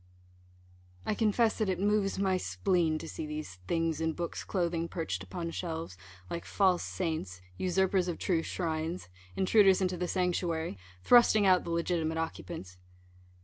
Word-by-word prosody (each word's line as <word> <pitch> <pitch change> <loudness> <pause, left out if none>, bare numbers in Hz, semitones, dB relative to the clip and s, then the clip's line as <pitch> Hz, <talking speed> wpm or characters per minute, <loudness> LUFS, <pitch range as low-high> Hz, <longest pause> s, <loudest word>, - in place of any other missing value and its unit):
I - - +1
confess 220 +1 +2
that 215 -3 +1
it 185 -2 -1
moves 205 0 +1
my 190 -1 +2
spleen 175 -3 +1
to - - -7
see 155 - -5
these 150 -12 -6
things 165 -2 0
in 160 0 0
books' 170 0 -4
clothing 170 -3 -1
perched 165 -1 -3
upon 170 -2 -5
shelves, 165 - -4 0.3
like 170 - -4
false 185 -3 +2
saints, 160 - -3 0.2
usurpers 185 0 +1
of 175 - -2
true 170 -4 +1
shrines, 165 - -3 0.3
intruders 195 0 +5
into 185 -1 0
the 180 +1 -2
sanctuary, 170 - -1 0.2
thrusting 225 -4 +6
out 185 -1 +4
the - - -5
legitimate 170 -1 0
occupants. 160 - -5
175 Hz, 145 wpm, -31 LUFS, 160-190 Hz, 0.3 s, thrusting